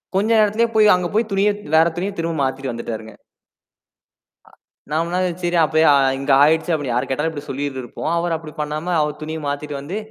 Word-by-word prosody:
கொஞ்ச 205 +4 +1
நேரத்திலேயே 215 +2 +2
போய் 210 -2 +6
அங்க 180 -1 -1
போய் 220 0 +1
துணிய 195 +1 +2 0.3
வேற 160 +1 +6
துணிய 190 +3 -2
திரும்ப 165 -1 -2
மாத்திட்டு 130 -1 -2
வந்துட்டாருங்க. 110 -2 -6 1.3
ஆ. - - -20 0.4
நம்மனா 170 +3 0 0.2
சரி 175 0 +1
அப்பயே 155 +1 +2 0.3
இங்க 140 0 -1
ஆயிடுச்சு 160 +3 +2
அப்படின்னு 140 -6 -1
யாரு 125 +1 0
கேட்டாலும் 150 +5 -1
இப்படி 145 -2 -8
சொல்லிட்டு 135 -1 -3
இருப்போம். 140 +6 -5
அவரு 170 -1 0
அப்படி 155 -1 -11
பண்ணாம 155 +4 -3
அவர் 150 0 -2
துணிய 160 +1 -5
மாத்திட்டு 145 0 -4
வந்து 175 +9 -5
160 Hz, 180 wpm, -20 LUFS, 145-175 Hz, 1.3 s, போய்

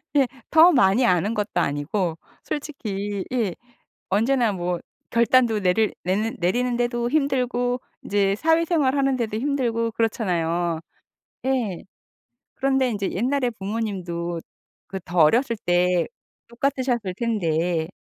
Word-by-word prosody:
예. 275 -3 +4 0.2
더 325 +3 +7
많이 245 - +4
아는 200 +1 +2
것도 210 -2 -2
아니고 160 +4 -1 0.3
솔직히 205 -9 -4
예 220 -8 0 0.6
언제나 230 +2 +2
뭐 175 -1 -2 0.3
결단도 235 -1 +3
내릴 195 +3 +2
내는 210 +5 0
내리는 240 +8 +1
데도 240 0 0
힘들고 250 -3 0 0.2
이제 200 -1 +2
사회 325 +6 +2
생활하는 275 -5 +2
데도 220 -3 -2
힘들고 235 -3 0
그렇잖아요. 175 -7 0 0.7
예. 240 -9 -1 0.7
그런데 265 -1 +2
인제 200 -3 -2
옛날에 250 +5 0
부모님도 190 -6 -4 0.5
그 190 - -5
더 175 +1 -4
어렸을 230 - +4
때 180 0 +3 0.4
똑같으셨을 245 -5 -1
텐데 170 -7 0
225 Hz, 260 characters per minute, -23 LUFS, 185-255 Hz, 0.7 s, 더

